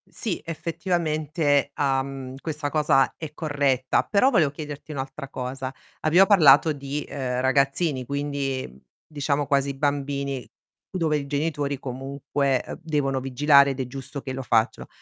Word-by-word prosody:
Sì, 215 -7 -2
effettivamente, 155 -4 0
uhm, 135 -1 -1
questa 150 -2 -3
cosa 145 -3 +3
è 155 -2 -8
corretta, 145 -5 +1
però, 210 +6 +3
volevo 170 - +4
chiederti 150 +1 -8
un'altra 135 0 -6
cosa. 130 +1 -5 0.3
Abbiamo 175 +5 +5
parlato 155 -5 +6
di, 140 +1 -5
uhm, 125 -3 -3
ragazzini, 135 +2 +1
quindi, 140 -1 -2
mhmm, 65 - -16 0.3
diciamo 145 -1 -1
quasi 140 -1 +1
bambini, 140 -2 -2 0.5
dove 160 -5 +1
i 140 -1 -5
genitori 145 -1 -1
comunque, 135 +1 -2
uhm, - - -7
devono 145 -4 0
vigilare 140 +2 +5
ed 135 - -6
è 130 - -1
giusto 135 +2 -7
che 130 - -5
lo 135 - -4
facciano. 115 -3 +1
140 Hz, 140 wpm, -25 LUFS, 135-150 Hz, 0.5 s, parlato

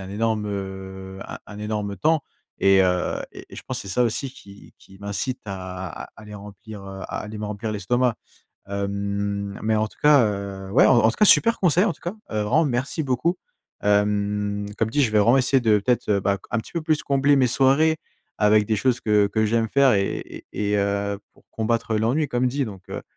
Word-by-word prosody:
a - - -8
un - - -10
énorme 110 0 -1
heu, 95 -1 -6
un - - -7
un 105 - -10
énorme 105 -1 -3
temps 155 - +2 0.4
et 95 0 +5
heu, 90 -1 0
et - - -10
et - - -11
je - - -8
pense - - -5
c'est 100 - -9
ça 110 +6 +1
aussi 120 +3 -1
qui 100 -6 -15
qui 95 0 -18
m'incite 100 +6 -3
à 95 -3 -6
à - - -15
aller 105 -1 -11
remplir, 105 +1 -10
heu, 95 0 -8
à - - -5
aller 105 +1 -7
me 105 - -5
remplir 105 +1 -4
l'estomac. 120 +4 0 0.5
Hem, 100 0 -3
mais 110 0 +1
en 110 0 0
tout - - -23
cas, 145 -5 +6
heu, 100 -2 -4
ouais, - - +5
en 120 -3 +5
tout - - -8
cas 210 - +4
super 230 +3 +5
conseil, 180 +1 +3
en 205 - +1
tout - - -18
cas, 175 +4 -4 0.2
vraiment 110 +9 +1
merci 140 +3 -1
beaucoup, 140 +6 0 0.5
hem. 105 0 +1
Comme 115 - +1
dit, 145 +5 +2
je 120 - +2
vais 110 - +3
vraiment 115 +5 +5
essayer 130 +1 +3
de, 110 -3 +3
peut 115 +5 +1
être, 120 - -3
heu, 100 -2 +2
bah, 100 +1 0
co - - -20
un 115 - 0
petit 110 - -8
peu 170 - -2
plus 155 -1 0
combler 140 +1 +3
mes 130 - +4
soirées 140 +6 +3 0.4
avec 105 0 +4
des 110 - +1
choses 120 +3 +1
que 105 -2 +3
que 110 +2 0
j'aime 115 +1 +1
faire 140 +1 +4
et 100 -1 -2
et 105 -1 -2
et - - +3
heu, 100 0 -1 0.2
pour - - -24
combattre 115 0 -1
l'ennui, 120 +8 +1
comme 125 -2 0
dit 135 +3 0
donc, 95 -5 -10
heu. - - -6
105 Hz, 225 wpm, -23 LUFS, 100-125 Hz, 0.5 s, cas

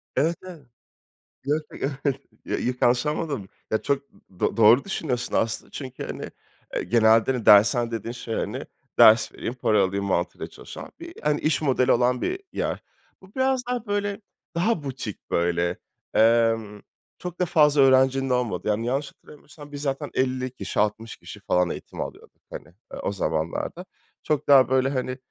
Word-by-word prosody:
Evet, 160 +6 +2
evet. 170 -7 -11 0.8
Yo 145 +2 +2 0.2
yo 135 - -2 0.2
yok 140 -2 +2 0.3
ya - - -2 0.2
yanlış 120 +3 +3
anlamadım. 150 - -2 0.2
Ya, 110 - +1
çok 140 0 0 0.4
do - - 0
doğru 115 +4 +6
düşünüyorsun 130 -10 -3
aslında 110 -1 -1
çünkü, 130 -2 -7
hani, - - -6 0.4
eee, - - -1
genelde, 110 +3 +4
hani, 120 -3 -4
dershane 115 +3 +6
dediğin 115 0 -4
şey, 120 -2 -6
hani, - - -3 0.3
ders 110 +1 +7
vereyim, 120 - -4
para 110 -5 +2
alayım 100 +1 -1
mantığıyla 90 -2 -1
çalışan - - -10
bir, - - -9
hani, 150 0 +1
iş 155 -1 +1
modeli 130 -3 +2
olan 125 +1 +2
bir 375 +1 -2
yer. - - -3 0.4
Bu 190 +1 -18
biraz 260 -1 +1
daha, 245 -2 -2
böyle, 205 +1 -2 0.3
daha 175 -2 +1
butik 130 -6 -6
böyle. 85 0 +1 0.4
Emm, 115 -2 +3 0.4
çok 180 0 -7
da 180 - +2
fazla 150 -4 +4
öğrencinin 135 0 +4
olmadığı. 125 -7 -1
Yani, 105 +2 0
yanlış 135 +4 -1
hatırlamıyorsam 145 0 -15
biz 145 0 -6
zaten 135 -2 -2
50 130 0 -1
kişi, 100 -6 -4
60 105 +2 -1
kişi - - -11
falan 90 -1 +1
eğitim - - -6
alıyorduk, - - -9
hani, 80 - -9 0.3
o - - 0
zamanlarda. 85 - -3 0.4
Çok 150 -2 -1
daha, 135 -3 +7
böyle, 130 0 +2
hani, 130 -1 -3
130 Hz, 160 wpm, -25 LUFS, 110-145 Hz, 0.8 s, ders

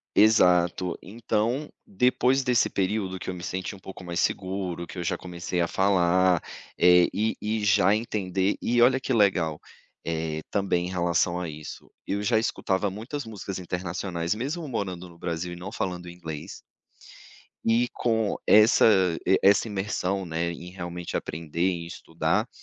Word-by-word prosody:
Exato. 90 -4 +4
Então, 115 +6 -2 0.2
depois 135 - +2
desse 125 -4 +2
período, 95 -1 -1
que - - -5
eu - - -5
me 90 - -8
senti 95 +2 -4
um - - -15
pouco 95 0 -10
mais 85 -1 -4
seguro, 95 -2 -2
que 90 - -10
eu 90 - -3
já - - 0
comecei 90 0 -4
a 85 - +1
falar, 95 -2 +3 0.3
eh, 90 0 +6
e 110 +2 0
e 110 0 -1
já 100 -1 +4
entender 100 -3 -1
e 120 +1 +1
olha 130 +2 +5
que 130 - -3
legal, 95 -8 +2 0.4
eh, 80 -1 -2
também 95 -4 0
em - - -4
relação 85 -1 +1
a 90 -1 -3
isso, 75 -1 -9 0.2
eu 100 +1 -2
já 110 +2 +2
escutava 100 -3 0
muitas 120 +9 -6
músicas 100 -4 -6
internacionais, 90 0 -3
mesmo 145 +9 -4
morando 95 -8 -4
no 85 -1 -16
Brasil 85 0 -3
e 85 - -7
não 95 +3 -7
falando 90 -5 -4
inglês 80 -4 -8 1.1
e 115 +2 +3
com 110 -3 0
essa 110 +2 +6 0.4
e 95 +1 +4
essa 100 +3 +5
imersão, 95 -1 -2
né, 85 0 -2
em 85 +1 -9
realmente 85 -1 -5
aprender, 85 +3 -2
em 85 -2 -4
estudar, 85 -1 -1
95 Hz, 160 wpm, -26 LUFS, 85-105 Hz, 1.1 s, eh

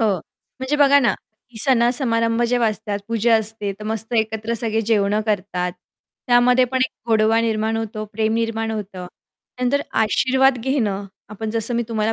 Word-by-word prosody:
हो. 215 -3 +2 0.5
म्हणजे 270 +3 -1
बघा 285 -1 +5
ना, 235 -7 +2 0.4
की 230 - -8
सण-समारंभ 235 -2 +3
जेव्हा 240 -2 +2
असतात, 210 -1 -4
पूजा 230 0 +2
असते, 215 -2 -1
तर 210 - -9
मस्त 220 +2 -1
एकत्र 220 +1 -2
सगळे 225 -1 -1
जेवणं 210 -1 +2
करतात. 185 -3 -2 0.5
त्यामध्ये 250 +1 +4
पण 260 +1 -2
एक - - -25 0.2
गोडवा 220 0 +3
निर्माण 220 -1 -1
होतो, 220 -1 -4
प्रेम 220 +1 0
निर्माण 225 -1 -2
होतं. 195 -4 -6 0.5
त्यानंतर 255 +3 0 0.2
आशीर्वाद 260 +4 +2
घेणं, 225 -6 -1 0.2
आपण 215 +1 -5
जसं 230 +1 0
मी 235 - +1
तुम्हाला 220 -1 -1
225 Hz, 160 wpm, -20 LUFS, 215-240 Hz, 0.5 s, बघा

